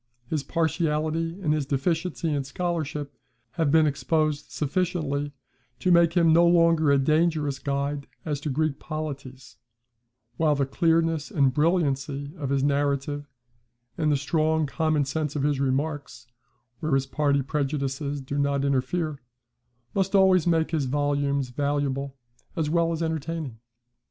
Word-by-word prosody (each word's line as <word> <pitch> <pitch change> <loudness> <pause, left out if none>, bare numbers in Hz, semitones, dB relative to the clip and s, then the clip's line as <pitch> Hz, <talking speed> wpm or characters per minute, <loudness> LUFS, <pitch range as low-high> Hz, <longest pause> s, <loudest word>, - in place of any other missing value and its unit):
His 155 -2 0
partiality, 160 +2 -1
and 150 -3 +2
his 150 -3 -1
deficiency 165 +3 -1
in 140 -1 0
scholarship, 150 -1 -3 0.4
have 160 0 0
been 160 +1 +5
exposed 155 +1 0
sufficiently 150 -3 -1 0.5
to 185 - +1
make 170 -1 +5
him 165 -2 +4
no 170 +1 +6
longer 165 -3 +4
a 140 - +5
dangerous 155 0 +1
guide 140 0 -2 0.2
as 150 -3 -2
to 150 - -3
Greek 150 +1 0
polities; 135 - -7 0.8
while 155 -2 +3
the 140 -1 +1
clearness 165 +1 +1
and 140 - +2
brilliancy 145 -3 0
of 140 -3 -3
his 135 -1 +1
narrative, 145 0 0 0.7
and 155 -1 +1
the 145 - +3
strong 155 +2 +1
common 155 0 0
sense 150 +1 -2
of 140 - -1
his 145 -2 +1
remarks 140 -2 -2 0.5
(where 155 -3 0
his 135 0 +1
party 140 0 +1
prejudices 140 0 -2
do 140 +2 -3
not 140 0 +1
interfere) 140 +2 -1 0.7
must 195 0 0
always 190 -3 +5
make 165 -2 +2
his 155 -4 0
volumes 140 -1 0
valuable 140 0 -2 0.4
as 155 -2 -1
well 170 0 +2
as 165 0 -2
entertaining. 160 -6 -3
150 Hz, 140 wpm, -26 LUFS, 140-160 Hz, 0.8 s, no